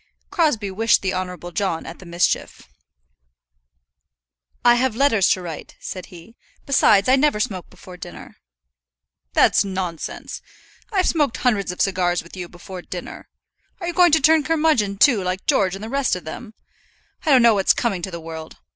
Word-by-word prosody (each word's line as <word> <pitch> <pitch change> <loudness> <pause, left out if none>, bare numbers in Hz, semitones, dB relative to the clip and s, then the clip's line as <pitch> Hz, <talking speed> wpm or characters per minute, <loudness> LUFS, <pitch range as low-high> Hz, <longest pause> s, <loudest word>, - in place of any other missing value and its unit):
Crosbie 240 - +1
wished 220 +3 +2
the 190 - 0
Honourable 180 -1 -5
John 175 -3 -2
at 170 - -9
the 185 - -13
mischief. 170 +1 -1 2.0
"I 240 - +8
have 240 -1 +1
letters 225 -7 +3
to 185 - -6
write," 165 -3 -8
said 185 -1 -7
he. 180 +6 -14 0.3
"Besides, 215 -7 +4
I 260 - +6
never 280 -5 +2
smoke 195 -6 -3
before 185 0 -13
dinner." - - -11 1.0
"That's - - +4
nonsense. 185 -4 -5 0.5
I've 380 -3 +1
smoked 295 -7 +1
hundreds 215 -7 0
of 180 - -5
cigars 180 -3 +1
with 170 - -13
you 180 -2 -7
before 180 +1 -10
dinner. 175 0 -8 0.5
Are 355 - -5
you 345 - -2
going 350 0 +5
to 320 - +6
turn 315 +2 +5
curmudgeon, 300 -11 +1
too, 215 -3 +4
like 185 +1 -3
George 190 -2 +2
and 195 - -9
the - - -5
rest 275 -1 0
of 180 - -7
them? 215 +7 -8 0.7
I - - -1
don't 260 -4 +6
know 235 -1 +6
what's 195 -2 +3
coming 200 -7 -1
to 190 - -4
the 170 -2 -7
world! 160 -1 -9
195 Hz, 175 wpm, -21 LUFS, 180-255 Hz, 2.0 s, I